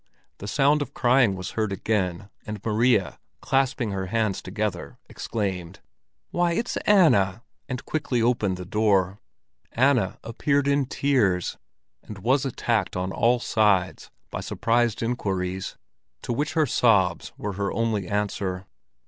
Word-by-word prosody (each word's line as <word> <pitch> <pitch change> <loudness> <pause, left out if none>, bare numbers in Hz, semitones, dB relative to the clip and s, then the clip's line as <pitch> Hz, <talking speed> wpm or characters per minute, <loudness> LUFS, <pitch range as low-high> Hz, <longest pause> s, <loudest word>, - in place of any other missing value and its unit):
The 100 - -7
sound 145 +5 +3
of 140 -1 -5
crying 120 -5 +3
was 95 -1 -6
heard 110 -2 -1
again, 95 -1 -2
and 105 -1 -6
Maria, 110 -2 +2 0.2
clasping 135 -4 0
her 95 -1 -3
hands 110 -1 0
together, 95 -1 -4
exclaimed: 95 -4 -4 0.5
"Why, 175 -1 +1
it's 230 +6 -2
Anna!" 120 - +4 0.3
and 125 -2 -4
quickly 140 -5 -1
opened 115 -5 +1
the 90 - -7
door. 100 -1 +1 0.5
Anna 125 -6 +2
entered 140 +4 0
in 140 -2 +2
tears, 110 - +1 0.4
and 105 - -10
was 130 +7 +1
attacked 120 -3 -1
on 90 +1 -2
all 120 +4 +2
sides 100 -5 +1 0.2
with - - -4
surprised 115 -1 0
inquiries, 95 -5 -2 0.5
to - - -2
which 145 +5 -2
her 160 -2 +3
sobs 105 -8 +2
were 105 -1 -4
her 100 +1 -2
only 110 -5 -1
answer. 100 -2 -2
110 Hz, 135 wpm, -25 LUFS, 95-125 Hz, 0.5 s, Anna